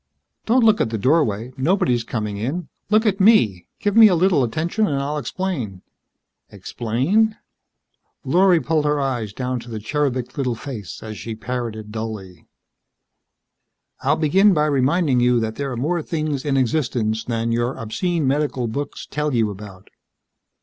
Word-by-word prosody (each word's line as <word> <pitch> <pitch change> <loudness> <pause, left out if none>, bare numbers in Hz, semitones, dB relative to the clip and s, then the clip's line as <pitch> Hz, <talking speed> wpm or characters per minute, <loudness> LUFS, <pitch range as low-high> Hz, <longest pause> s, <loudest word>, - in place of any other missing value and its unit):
"Don't 240 +2 +4
look 220 -1 +4
at - - +1
the 110 - -2
doorway. 125 -2 +1
Nobody's 130 - +1
coming 105 -3 -4
in. 140 - -3 0.2
Look 215 +2 +3
at 205 -2 +1
me. 115 - +4
Give 205 -1 -1
me 225 -1 +9
a 185 - +3
little 175 -5 +3
attention 165 - 0
and 145 - -1
I'll 145 +2 -2
explain." 140 - -4 0.7
"Explain?" 170 - 0 0.9
Lorry 180 -1 +4
pulled 155 -1 0
her 150 0 +1
eyes 125 -7 -2
down 125 +3 -3
to 120 - -11
the 110 - -5
cherubic 130 +1 -2
little 125 -3 0
face 115 -6 -8
as 110 -3 -7
she 115 +4 -6
parroted 110 -2 -5
dully. 105 -6 -7 1.5
"I'll - - +2
begin 190 +6 +4
by 150 0 +2
reminding 140 0 +2
you 120 0 +3
that 110 -1 -3
there 140 -1 -3
are 125 - -4
more 165 +7 0
things 155 -3 -3
in 140 -2 +1
existence 120 -5 0
than 115 -1 -1
your 120 +2 -1
obscene 160 - -2
medical 135 -2 0
books 140 +6 -5
tell 150 -2 -2
you 110 -3 +1
about." 95 -1 -11
130 Hz, 155 wpm, -21 LUFS, 115-160 Hz, 1.5 s, me